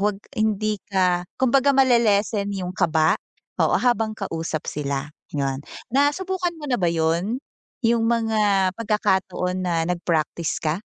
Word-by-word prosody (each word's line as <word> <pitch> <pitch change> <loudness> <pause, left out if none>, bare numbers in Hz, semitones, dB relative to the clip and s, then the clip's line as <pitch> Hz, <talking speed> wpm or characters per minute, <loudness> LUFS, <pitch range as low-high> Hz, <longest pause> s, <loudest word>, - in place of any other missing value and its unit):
huwag 205 -1 0 0.2
hindi 215 -1 0
ka 180 -2 +2 0.2
kumbaga 265 +2 +4
ma-le-lessen 220 -5 +3
'yung 180 -1 -4
kaba 160 -3 +3 0.5
o - - +3
habang 225 -3 +1
kausap 165 -5 -4
sila 140 -1 -3 0.3
'yun, 135 -2 -1 0.3
nasubukan 350 +6 +1
mo 295 - -6
na 245 - +3
ba 175 - +2
'yun, 170 +8 0 0.4
'yung 230 0 +3
mga 215 -5 +2
pagkakataon 190 -4 0
na 170 -3 0
nagpraktis 170 -2 -1
ka? 155 +2 0
200 Hz, 125 wpm, -23 LUFS, 170-230 Hz, 0.5 s, kumbaga